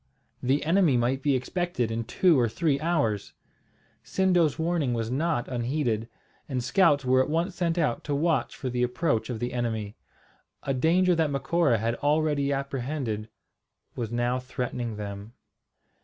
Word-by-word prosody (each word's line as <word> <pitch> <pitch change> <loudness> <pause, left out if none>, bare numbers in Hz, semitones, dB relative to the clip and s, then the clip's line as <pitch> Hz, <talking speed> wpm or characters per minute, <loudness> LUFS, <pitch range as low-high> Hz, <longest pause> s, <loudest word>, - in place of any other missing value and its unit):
The 135 +4 +1
enemy 165 -5 +4
might 125 +3 0
be 140 -1 +2
expected 130 -3 -1
in 115 0 -2
two 165 +4 +3
or 120 -2 +2
three 145 +3 0
hours! 140 - 0 0.7
Sindo's 180 -6 +2
warning 160 -6 0
was 115 0 -2
not 150 -2 0
unheeded; 120 -2 -1 0.4
and 130 -3 -2
scouts 145 0 +3
were 130 +1 +4
at 130 - -1
once 170 +4 0
sent 170 -2 -1
out 120 -8 0
to 145 - -1
watch 155 -3 0
for 135 - -5
the 125 0 -1
approach 125 -1 0
of 120 - -3
the 120 +1 -3
enemy. 110 -4 -2 0.7
A 135 - -1
danger 175 +7 +3
that 160 -3 +1
Macora 140 -1 +1
had 115 +2 -1
already 145 -1 +1
apprehended 135 -5 -3 0.7
was 115 -3 -4
now 120 +1 0
threatening 125 -3 -4
them. 100 +1 -7
135 Hz, 155 wpm, -27 LUFS, 120-160 Hz, 0.7 s, enemy